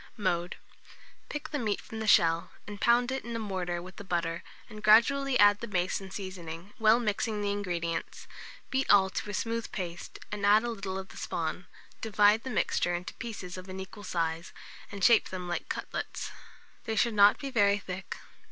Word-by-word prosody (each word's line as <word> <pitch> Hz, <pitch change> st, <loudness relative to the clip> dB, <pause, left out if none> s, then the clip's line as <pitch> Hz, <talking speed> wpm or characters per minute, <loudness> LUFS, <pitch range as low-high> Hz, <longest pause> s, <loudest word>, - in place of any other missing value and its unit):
Mode. 175 Hz, -4 st, -1 dB, 0.7 s
Pick 295 Hz, -, -5 dB
the 295 Hz, -, -2 dB
meat 215 Hz, -4 st, -1 dB
from 220 Hz, -, -8 dB
the 220 Hz, -, -3 dB
shell, 170 Hz, -3 st, +4 dB
and 205 Hz, -1 st, -9 dB
pound 245 Hz, +1 st, +4 dB
it 265 Hz, -, -3 dB
in 235 Hz, 0 st, -5 dB
a -, -, 0 dB
mortar 185 Hz, -5 st, -3 dB
with 185 Hz, +1 st, -12 dB
the -, -, -7 dB
butter, 170 Hz, -3 st, -2 dB, 0.3 s
and 215 Hz, -2 st, -10 dB
gradually 255 Hz, +5 st, +5 dB
add 205 Hz, -1 st, +6 dB
the 235 Hz, -, -5 dB
mace 185 Hz, -2 st, -1 dB
and 190 Hz, -1 st, -9 dB
seasoning, 185 Hz, -1 st, -7 dB
well 220 Hz, +1 st, +5 dB
mixing 215 Hz, -1 st, -1 dB
the 200 Hz, -, 0 dB
ingredients; 175 Hz, -5 st, -3 dB, 0.5 s
beat 265 Hz, 0 st, 0 dB
all 190 Hz, -2 st, +6 dB
to 210 Hz, -, -4 dB
a -, -, -4 dB
smooth 230 Hz, +1 st, -2 dB
paste, 175 Hz, -3 st, -6 dB
and 205 Hz, 0 st, -4 dB
add 210 Hz, +2 st, +6 dB
a 240 Hz, -, -2 dB
little 195 Hz, -4 st, -4 dB
of 190 Hz, 0 st, -7 dB
the -, -, -13 dB
spawn; 170 Hz, +2 st, -3 dB, 0.3 s
divide 210 Hz, 0 st, +4 dB
the 260 Hz, -, -6 dB
mixture 175 Hz, -7 st, +1 dB
into 175 Hz, +1 st, -5 dB
pieces 200 Hz, -7 st, -7 dB
of 185 Hz, +1 st, -11 dB
an 185 Hz, 0 st, -6 dB
equal 190 Hz, +2 st, -9 dB
size, 165 Hz, -2 st, -2 dB, 0.4 s
and 200 Hz, -2 st, -6 dB
shape 230 Hz, 0 st, +5 dB
them 180 Hz, -1 st, -5 dB
like 175 Hz, -, -3 dB
cutlets. -, -, -4 dB, 0.5 s
They 220 Hz, -, -2 dB
should 230 Hz, +1 st, +2 dB
not 205 Hz, 0 st, +6 dB
be 275 Hz, -1 st, -5 dB
very 205 Hz, -4 st, +4 dB
thick. 190 Hz, -1 st, -6 dB
200 Hz, 195 wpm, -29 LUFS, 180-220 Hz, 0.7 s, add